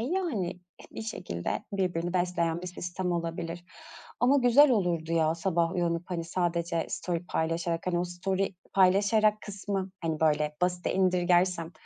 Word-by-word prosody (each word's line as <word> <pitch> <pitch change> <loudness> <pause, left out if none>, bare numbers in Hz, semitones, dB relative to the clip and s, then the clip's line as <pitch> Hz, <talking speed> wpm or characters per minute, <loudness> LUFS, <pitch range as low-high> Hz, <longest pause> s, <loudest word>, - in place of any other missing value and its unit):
yani, 240 - -2 0.3
bir - - -7
şekilde 180 - -4
birbirini 175 -3 -1
besleyen 175 -2 0
bir - - -5
sistem 180 0 -3
olabilir. 170 0 -4 0.6
Ama 255 +3 +5
güzel 270 +3 +6
olurdu 175 -7 0
ya, 160 -1 +2
sabah 170 -1 0
uyanıp, 170 -2 0
hani, 170 -2 -2
sadece 170 -1 -1
story 175 -1 -3
paylaşarak, 165 +1 -1
hani, 175 -1 +1
o 175 - 0
story 190 +2 -2 0.2
paylaşarak 205 +3 +4
kısmı, 195 -1 -4
hani, 160 -2 -2
böyle, 150 -1 +2
basite 180 0 0
indirgersem, 180 -2 +2
175 Hz, 135 wpm, -29 LUFS, 170-190 Hz, 0.6 s, güzel